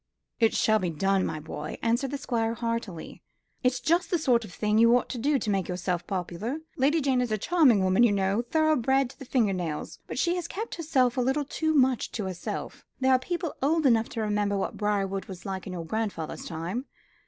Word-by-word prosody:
"It 225 -2 +3
shall 215 0 +3
be 180 -3 -1
done, 195 +4 +1
my 155 - -4
boy," 150 0 -6
answered 240 +4 +1
the 285 - -3
Squire 230 -4 -1
heartily. 230 -7 -4 0.4
"It's 250 0 +1
just 335 +8 +1
the 355 - +2
sort 245 -7 +2
of 210 - -10
thing 210 +3 +1
you 230 +1 +6
ought - - -3
to 250 - -4
do 285 +4 +2
to 230 - -3
make 195 -3 0
yourself 180 -1 -2
popular. 190 - -3 0.2
Lady 295 +5 +2
Jane 265 -2 +2
is 245 -3 -2
a 215 - +1
charming 260 - +4
woman, 185 +4 +3
you 240 -3 +6
know, 195 +2 +1
thoroughbred 270 -2 +2
to - - -20
the 270 - -8
finger 230 -6 +2
nails; 170 -5 -4
but - - -6
she 345 0 +2
has 355 - -3
kept 440 +4 -5
herself 270 -7 +1
a - - +3
little 265 +4 +1
too 315 +2 -1
much 260 -3 +2
to 215 - -3
herself. 185 -2 -5 0.2
There 265 0 +3
are 255 - +5
people 345 +3 -3
old 310 +3 +2
enough 230 -3 +4
to 230 - -4
remember 205 -1 0
what 195 - -2
Briarwood 195 -2 -1
was 185 -2 -10
in 190 -1 -5
your 170 -2 -5
grandfather's 205 -4 -3
time. 180 +11 -4
230 Hz, 215 wpm, -27 LUFS, 195-270 Hz, 0.4 s, you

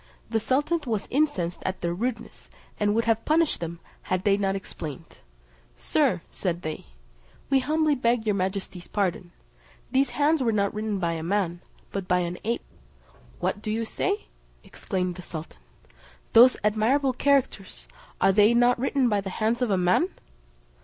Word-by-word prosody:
The 225 - +2
sultan 295 +8 0
was 220 -4 -2
incensed 250 - 0
at 190 - -3
their 170 0 -1
rudeness, 240 +8 -5 0.3
and 205 0 +2
would 230 - +1
have 225 -1 +1
punished 320 0 +2
them 170 0 -5 0.2
had 185 0 -2
they 200 -1 +4
not 195 -1 0
explained: 155 -7 -8 0.6
"Sir," - - +1
said 175 -1 -3
they, 155 - -5 0.6
"we 270 - +5
humbly 305 +3 +2
beg 235 -3 +1
your 210 - +2
majesty's 190 -1 -3
pardon: 185 -3 -2 0.6
these 270 0 +3
hands 295 +3 +2
were 235 -3 +2
not 200 -2 +1
written 215 -1 -2
by 170 -3 0
a 165 -1 -3
man, 175 0 -1 0.3
but 195 -2 -4
by 180 - +3
an 175 0 -4
ape." 230 +3 -1 0.8
"What 205 - -1
do 215 - -5
you 225 +1 -1
say?" 400 - -2 0.4
exclaimed 180 -3 -3
the - - -7
sultan. 160 -2 -8 0.7
"Those 245 +3 +8
admirable 235 +6 +2
characters, 260 -7 0 0.3
are 195 - +5
they 210 +4 +5
not 245 0 +4
written 270 0 +1
by 205 -3 +1
the 195 - -5
hands 225 +5 -1
of 250 - +1
a 195 - +2
man?" 180 - +3
210 Hz, 165 wpm, -26 LUFS, 185-250 Hz, 0.8 s, Those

